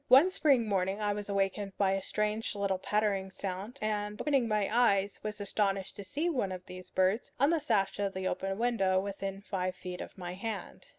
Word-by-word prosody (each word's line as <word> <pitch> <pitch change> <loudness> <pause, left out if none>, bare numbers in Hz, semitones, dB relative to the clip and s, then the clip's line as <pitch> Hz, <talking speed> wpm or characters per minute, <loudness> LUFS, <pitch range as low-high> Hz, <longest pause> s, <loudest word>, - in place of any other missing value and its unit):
One 275 +9 +7
spring 275 -10 +3
morning 195 0 0
I 205 -1 +1
was 205 0 -5
awakened 195 0 -1
by 195 -2 +3
a 195 0 0
strange 210 +2 -1
little 200 -2 0
pattering 200 -1 0
sound, 195 +6 -5
and, 210 -1 -1
opening 275 -5 +2
my 210 -2 +1
eyes, 200 -5 +3
was 215 0 -4
astonished 195 -1 0
to 200 - -6
see 290 - -1
one 250 - 0
of 180 -1 -6
these 185 0 -9
birds 190 +5 +1
on 280 +4 +5
the 335 - +3
sash 210 -10 +1
of 200 -1 -1
the 190 0 -1
open 195 +1 -2
window 210 -6 +2
within 195 0 -4
five 185 -2 -2
feet 180 0 -6
of - - -9
my 180 -1 -5
hand. 210 +2 -5
200 Hz, 200 wpm, -31 LUFS, 190-215 Hz, -, One